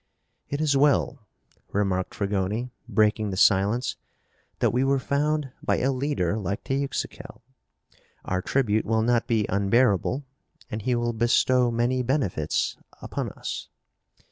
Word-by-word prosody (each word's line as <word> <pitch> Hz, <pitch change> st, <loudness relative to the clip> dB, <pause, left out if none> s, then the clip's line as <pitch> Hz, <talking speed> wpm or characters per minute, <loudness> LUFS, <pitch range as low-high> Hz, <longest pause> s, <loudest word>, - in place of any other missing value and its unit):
"It 145 Hz, -, -2 dB
is 150 Hz, -3 st, +2 dB
well," 140 Hz, -4 st, +2 dB, 0.4 s
remarked 95 Hz, -2 st, -1 dB
Fragoni, 105 Hz, +4 st, -1 dB, 0.2 s
breaking 105 Hz, -1 st, +2 dB
the 95 Hz, -, -4 dB
silence, 105 Hz, +6 st, +3 dB, 0.6 s
"that -, -, +2 dB
we 125 Hz, +2 st, +2 dB
were 135 Hz, +1 st, +3 dB
found 145 Hz, +1 st, 0 dB
by -, -, +1 dB
a 135 Hz, -, +1 dB
leader 130 Hz, -, -1 dB
like 100 Hz, 0 st, -3 dB
Teuxical. 135 Hz, -2 st, -4 dB, 0.8 s
Our 95 Hz, 0 st, -1 dB
tribute 110 Hz, -2 st, +1 dB
will 110 Hz, +1 st, +1 dB
not 120 Hz, 0 st, +2 dB
be 110 Hz, -4 st, +2 dB
unbearable, 100 Hz, +5 st, +2 dB, 0.5 s
and 110 Hz, 0 st, -3 dB
he 125 Hz, +3 st, 0 dB
will 120 Hz, 0 st, 0 dB
bestow 120 Hz, +2 st, +3 dB
many 120 Hz, +2 st, +1 dB
benefits 120 Hz, -, 0 dB, 0.2 s
upon -, -, -4 dB
us." -, -, -6 dB
120 Hz, 130 wpm, -25 LUFS, 100-135 Hz, 0.8 s, silence